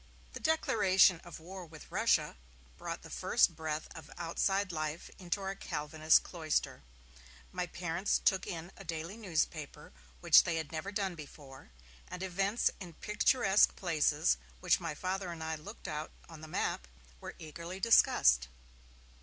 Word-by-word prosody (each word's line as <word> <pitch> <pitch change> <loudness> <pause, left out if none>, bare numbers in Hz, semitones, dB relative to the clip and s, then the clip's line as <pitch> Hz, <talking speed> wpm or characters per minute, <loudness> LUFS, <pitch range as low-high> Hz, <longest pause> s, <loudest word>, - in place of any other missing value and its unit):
The - - -6
declaration 195 - +4
of 175 - -10
war 185 +3 -9
with 160 -2 -13
Russia - - +2 0.4
brought - - -6
the - - -11
first - - +2
breath 155 -1 -3
of 160 -3 -11
outside 190 +3 0
life 155 0 -4
into 185 +2 -3
our 195 0 -3
Calvinist 155 -3 +2
cloister. 160 -4 -2 0.7
My 180 - -3
parents 175 +3 -1
took 190 -2 +1
in 170 +1 -6
a - - -11
daily 165 +2 -5
newspaper, 160 - -3 0.3
which - - +7
they 170 - -1
had 160 -2 -4
never 165 +5 -4
done 195 -2 -1
before, 145 - -12 0.4
and 180 +1 -6
events 195 +4 +1
in 180 -4 -9
picturesque 210 +2 +3
places, 155 - +2 0.2
which - - +3
my 165 -3 -4
Father 185 +1 -3
and 165 -1 -6
I 160 0 -2
looked 185 +9 -10
out 150 +1 -4 0.2
on 165 -2 -12
the 155 - -9
map, 65 - -2 0.3
were - - -8
eagerly 170 +4 -8
discussed. 65 - +5
170 Hz, 150 wpm, -33 LUFS, 155-190 Hz, 0.7 s, which